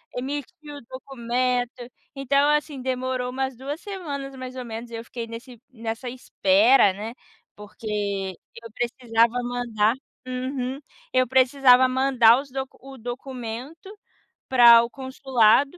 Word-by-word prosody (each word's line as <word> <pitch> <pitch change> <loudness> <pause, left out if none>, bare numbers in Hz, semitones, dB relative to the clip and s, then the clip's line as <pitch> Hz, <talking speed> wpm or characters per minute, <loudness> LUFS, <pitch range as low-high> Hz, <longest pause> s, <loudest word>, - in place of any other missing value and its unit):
emitir 290 +3 -6
o - - -8
documento. 250 -1 -2 0.3
Então 280 +2 +2
assim, 300 -3 -1
demorou 255 -1 -2
umas 265 0 -3
2 275 +5 -6
semanas 285 -9 -6
mais 255 0 -8
ou 255 - -5
menos 230 +1 -7
e - - -6
eu 230 - -6
fiquei 235 0 -6
nesse 235 +1 -10
nessa 230 +1 -5
espera, 215 -2 +4
né, 215 +4 -6 0.4
porque 205 -2 -4 0.3
eu 230 - -10
precisava 235 -1 +1
mandar 235 -3 0 0.3
Uhum. 255 +1 -3 0.3
Eu 255 0 +4
precisava 260 0 +5
mandar 255 -2 +4
os 275 -1 -9
do 265 0 -2 0.2
o 270 0 -11
documento 250 - -7 0.6
para 235 -2 +8
o 235 - -4
consulado. 265 +2 +2
250 Hz, 130 wpm, -24 LUFS, 230-270 Hz, 0.6 s, para